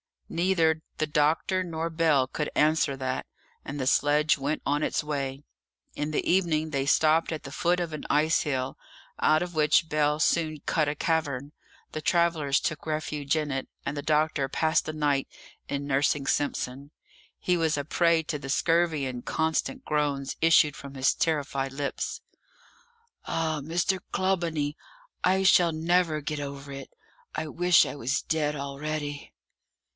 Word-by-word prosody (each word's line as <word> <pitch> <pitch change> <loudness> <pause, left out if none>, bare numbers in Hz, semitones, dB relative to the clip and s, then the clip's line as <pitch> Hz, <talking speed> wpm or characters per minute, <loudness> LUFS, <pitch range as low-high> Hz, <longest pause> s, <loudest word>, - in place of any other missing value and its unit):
Neither 165 -2 +2 0.2
the 155 - +1
doctor 155 +5 +1
nor 165 -2 -3
Bell 160 -5 +3
could 150 +3 -3
answer 155 -2 +3
that, 130 -1 -3 0.4
and 145 - -5
the 130 - -1
sledge 150 +3 +3
went 140 +3 -2
on 145 +1 +1
its - - 0
way. 140 -2 -3 0.5
In 150 +1 -3
the - - -1
evening 165 -4 +2
they 135 -2 -1
stopped 160 +3 +3
at 155 - -6
the 140 - -8
foot 175 +5 +1
of 170 -2 -3
an 155 - -6
ice 155 +3 +3
hill, 130 -3 -2 0.4
out 155 +2 +3
of 175 0 -7
which 155 +1 +3
Bell 150 0 +1
soon 155 -1 +1
cut 155 -2 +1
a 145 - -1
cavern; 145 -4 -1 0.4
the 155 - -5
travellers 165 -5 +2
took 155 -2 -3
refuge 150 -2 -1
in 150 -2 -1
it, 135 -1 -3 0.2
and 140 - -2
the 145 - -3
doctor 150 -2 +1
passed 160 +3 +1
the 155 - -4
night 145 -3 0 0.4
in 140 0 -3
nursing 140 0 +1
Simpson; 140 -1 -2 0.5
he 180 -1 +1
was 160 -2 +1
a 145 - -1
prey 170 +1 +2
to 150 -1 -4
the 135 - -8
scurvy, 165 0 +2
and 125 -2 -5
constant 160 +12 -1
groans 145 -2 -1
issued 155 -2 +5
from 140 0 -10
his 130 0 +3
terrified 140 -4 -1
lips. 140 0 -3 1.0
"Ah, 160 -2 -1
Mr. 175 +5 0
Clawbonny, 165 -6 0 0.5
I 190 +1 +3
shall 175 -3 +5
never 165 -1 +1
get 150 +1 -3
over 140 0 -6
it. 135 -1 -8 0.5
I 155 - -2
wish 175 +2 +4
I - - -5
was 135 +1 -1
dead 150 -2 0
already." 145 +1 -5
150 Hz, 160 wpm, -27 LUFS, 140-160 Hz, 1.0 s, issued